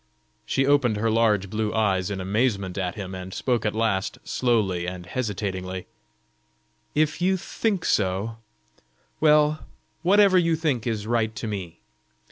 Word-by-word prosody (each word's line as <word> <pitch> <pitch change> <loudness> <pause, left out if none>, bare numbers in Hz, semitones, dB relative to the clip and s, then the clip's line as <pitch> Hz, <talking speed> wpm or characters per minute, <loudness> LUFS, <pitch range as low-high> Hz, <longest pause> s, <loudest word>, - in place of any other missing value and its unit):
She 135 - +1
opened 135 -6 +3
her 110 +1 +1
large 110 -3 +2
blue 105 +2 -2
eyes 95 -4 +1
in 100 -2 -3
amazement 100 -1 0
at 90 -3 -2
him, 95 -2 -6
and 95 0 -7
spoke 120 +1 0
at 105 - -2
last, 110 -3 0
slowly 100 -8 0
and 90 -1 -6
hesitatingly: 95 -4 -3 1.1
"If 155 +2 +1
you 190 +1 +3
think 200 0 -2
so 100 +3 0 0.8
well, 150 0 +4 0.4
whatever 195 +1 +5
you 165 -2 +2
think 145 -8 -1
is 110 -3 -2
right 110 -1 0
to 130 - -5
me. 95 -6 -5
110 Hz, 140 wpm, -25 LUFS, 95-135 Hz, 1.1 s, whatever